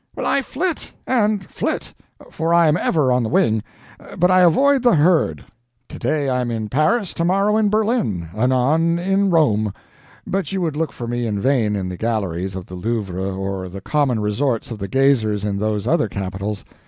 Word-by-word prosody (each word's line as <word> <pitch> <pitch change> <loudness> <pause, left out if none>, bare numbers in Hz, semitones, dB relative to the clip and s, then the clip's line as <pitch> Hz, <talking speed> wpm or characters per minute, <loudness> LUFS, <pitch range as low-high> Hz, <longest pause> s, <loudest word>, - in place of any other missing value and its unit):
I 275 - +1
flit 325 +5 -3
and 215 -6 +1
flit - - -3 0.4
for 165 +1 0
I 170 -1 +5
am 150 - +3
ever 150 -6 +1
on 125 0 +2
the 110 - -2
wing 110 0 +2 0.6
but 180 +1 +3
I 185 - +5
avoid 270 - +4
the 240 -5 +4
herd. 160 +2 +2 0.4
Today 140 +3 -2
I 125 -1 0
am 120 - -2
in 110 -2 -3
Paris, 185 - +1
tomorrow 195 +5 +1
in 215 -1 +2
Berlin, 210 - 0
anon 130 +8 +2
in 195 +3 +1
Rome; 110 - +2 0.5
but 195 +1 -2
you 195 - -1
would 165 -5 -1
look 160 0 -1
for 120 - -7
me 120 0 -2
in 105 -2 -2
vain 115 -4 +1
in 95 -2 -3
the 90 0 -6
galleries 95 -5 -2
of 95 -2 -6
the - - -13
Louvre 95 -1 -3
or 95 -1 -4
the 95 +2 -8
common 135 +2 0
resorts 115 +4 -1
of 110 - -6
the 100 - -4
gazers 115 -6 +2
in 100 -1 -2
those 105 -1 -1
other 155 -10 +1
capitals. 100 +2 -4
130 Hz, 185 wpm, -20 LUFS, 105-175 Hz, 0.6 s, I